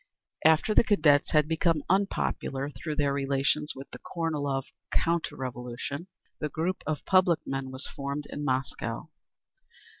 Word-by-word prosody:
_ - - +8
After 160 +7 +2
the - - +6
Cadets 155 -9 +4
had 150 -1 +4
become 160 -1 +2
unpopular 160 -7 0
through 150 +4 -5
their 145 -1 +2
relations 140 +2 +1
with 135 +1 -8
the - - -9
Kornilov 145 -5 -1 0.3
counter 170 0 +1
revolution, 125 +5 -5 0.3
the 150 - -2
Group 170 +6 -1
of 155 -2 -2
Public 185 -3 +4
Men 135 -1 -3
was 130 +1 -5
formed 140 +1 -4
in 145 - -4
Moscow. 130 0 -2
145 Hz, 145 wpm, -29 LUFS, 135-165 Hz, 0.3 s, _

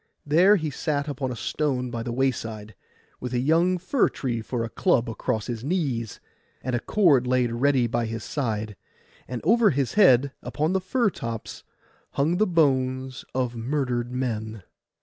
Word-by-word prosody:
There 175 +8 +5
he 155 -6 -2
sat 145 +1 -2
upon 135 -2 -3
a - - -4
stone 125 -1 -2
by 115 -2 -3
the 120 +1 -4
wayside, 115 -4 -2 0.5
with 125 0 -4
a - - +2
young 165 +7 +3
fir 200 +8 +1
tree 120 -4 -3
for 115 +1 -3
a 115 - -4
club 130 -8 +1
across 115 -1 -2
his 120 -2 -5
knees, 135 - -2 0.4
and 130 -1 -1
a - - +1
cord 145 - +3
laid 125 -2 +2
ready 130 +1 +2
by 115 0 -1
his 115 0 -5
side; 110 -6 -3 0.5
and 125 -2 -5
over 230 -2 +5
his 140 -5 -1
head, 140 - +5
upon 155 +4 -1
the 190 - +1
fir 220 +3 +1
tops, 115 -6 -6 0.5
hung 160 +5 +1
the 215 +2 +3
bones 130 -5 +1
of 125 -2 -1
murdered 120 0 -2
men. 110 -5 -3
130 Hz, 170 wpm, -25 LUFS, 120-150 Hz, 0.5 s, There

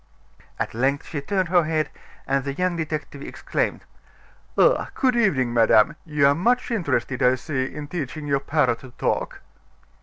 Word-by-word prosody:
At - - -3
length 135 +5 0
she 145 -4 -4
turned 185 +4 -1
her 175 -1 +4
head, 155 -1 -1 0.3
and 135 0 0
the 140 0 -3
young 180 +1 0
detective 155 -3 -4
exclaimed: - - -3 0.7
"Ah! - - +4
good 255 -3 +2
evening, 145 - +2
madame; 115 +3 +4
you 150 -2 +2
are 140 - +6
much 240 +11 +1
interested, 135 - -1
I 125 +1 +5
see, 130 0 -2
in 145 +2 -7
teaching 155 -2 -5
your 140 -1 +1
parrot 140 -4 +1
to 130 - -12
talk." - - -2
145 Hz, 160 wpm, -23 LUFS, 135-170 Hz, 0.7 s, are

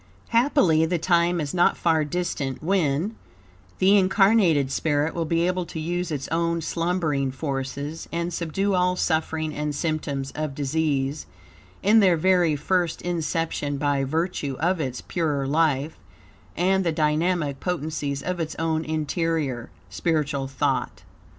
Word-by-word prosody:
Happily, 230 - +3
the 175 +1 0
time 170 +1 +2
is 145 -3 -3
not 175 -1 +3
far 160 -2 +2
distant 150 -4 -3
when, 175 +2 +1 0.6
the 195 +2 +5
incarnated 190 -7 +3
spirit 150 +1 0
will 170 -1 -2
be 165 +2 +1
able 180 0 0
to 160 - -6
use 175 +2 -2
its 140 -4 -3
own 170 0 0
slumbering 160 -4 -1
forces, 140 +2 -4
and 170 +1 -2
subdue 195 +5 -1
all 180 0 +2
suffering 160 -2 -1
and 150 0 -3
symptoms 145 -4 -2
of 150 -2 -4
disease 145 -1 -1 0.6
in 215 +3 +6
their 185 -5 +4
very 175 -2 +3
first 170 +3 0
inception, 165 -4 -2
by 140 -1 +1
virtue 155 -1 -2
of 175 +1 +1
its 130 -3 -3
purer 150 -5 -1
life 150 0 +1 0.6
and 190 +3 +2
the 170 - +1
dynamic 155 -1 0
potencies 155 -5 -3
of 180 -1 -3
its 160 -1 -3
own 160 -1 0
interior, 155 -5 -2 0.2
spiritual 145 - -1
thought. 135 0 -2
160 Hz, 135 wpm, -24 LUFS, 145-175 Hz, 0.6 s, in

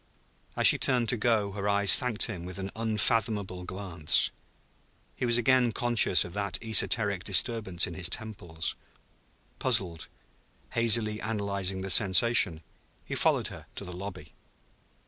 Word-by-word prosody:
As - - 0
she - - +9
turned 125 -3 +1
to - - +2
go 110 -3 0
her 100 0 -4
eyes 100 -3 +7
thanked 120 -4 0
him 95 -7 -3
with 90 +1 -8
an 95 0 -6
unfathomable 105 -3 -2
glance. 90 -5 0 0.8
He 125 - -3
was 120 0 +5
again 125 0 +2
conscious 120 -6 +2
of 90 - -10
that 100 -2 -3
esoteric 105 -3 0
disturbance 100 -3 +1
in 90 - -8
his 90 0 -2
temples. 90 -7 -5 0.8
Puzzled, 90 - -1 0.6
hazily 110 -2 0
analyzing 100 -3 -3
the 95 - -3
sensation, 95 -3 +3 0.4
he - - -7
followed - - +1
her - - -12
to - - -7
the 90 - -8
lobby. 95 +2 -9
100 Hz, 140 wpm, -27 LUFS, 95-115 Hz, 0.8 s, she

